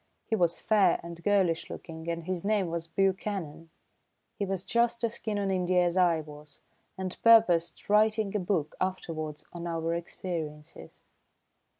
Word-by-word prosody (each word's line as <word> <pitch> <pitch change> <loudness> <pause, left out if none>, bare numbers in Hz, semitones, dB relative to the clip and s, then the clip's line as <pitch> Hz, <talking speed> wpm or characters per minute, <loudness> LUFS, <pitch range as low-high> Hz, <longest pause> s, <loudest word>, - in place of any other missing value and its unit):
He 220 - 0
was 175 -4 +1
fair 200 -5 +3
and 170 0 -9
girlish 190 -5 +2
looking, 160 0 -7
and 170 0 -3
his 180 0 -3
name 200 -4 +1
was 165 -1 -3
Buchanan. 185 -3 -2 0.7
He 200 - 0
was 190 -1 -3
just 235 0 +1
as 230 0 -1
keen 215 -2 -2
on 200 -1 0
India 180 -1 +2
as 175 0 0
I 175 -3 +3
was, 150 0 -13 0.4
and 185 -1 -4
purposed 180 -8 +5
writing 215 0 +3
a - - +2
book 175 -5 -1
afterwards 160 -5 -3
on 175 0 -5
our 165 0 -1
experiences. 165 - -6
180 Hz, 155 wpm, -29 LUFS, 165-200 Hz, 0.7 s, purposed